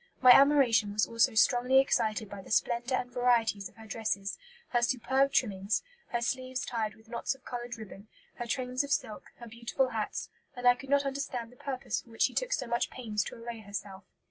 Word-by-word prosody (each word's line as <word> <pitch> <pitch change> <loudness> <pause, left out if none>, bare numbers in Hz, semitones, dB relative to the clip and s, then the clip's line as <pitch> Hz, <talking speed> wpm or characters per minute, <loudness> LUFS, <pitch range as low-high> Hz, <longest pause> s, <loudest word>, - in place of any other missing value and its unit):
My 255 -1 +8
admiration 260 -7 +5
was 210 - +2
also 230 +1 +2
strongly 245 +3 +4
excited 220 -5 +2
by 200 0 -8
the - - -14
splendour 240 +3 +1
and 250 - -4
varieties 235 -5 +1
of - - -26
her 220 0 -13
dresses, 205 -2 -2 0.3
her 240 - +2
superb 265 +3 +2
trimmings, 205 -5 0 0.2
her 240 - -2
sleeves 255 +1 -2
tied 220 -3 -2
with 220 0 -21
knots 235 +3 -2
of 265 - -23
coloured 240 -1 -5
ribbon, 215 -1 -11 0.3
her 240 - -4
trains 255 +1 -1
of 280 - -7
silk, 215 -5 -2
her 235 - -11
beautiful 235 +3 -1
hats, 220 -3 -3 0.3
and 245 0 0
I 245 - +9
could 265 +2 -11
not 280 0 +3
understand 270 -4 -3
the - - -17
purpose 260 0 -3
for - - -22
which 225 - 0
she - - +2
took - - -1
so 280 - 0
much 235 0 0
pains 215 -4 -2
to - - -7
array 230 0 -7
herself." 200 -2 -7
240 Hz, 205 wpm, -30 LUFS, 220-255 Hz, 0.3 s, I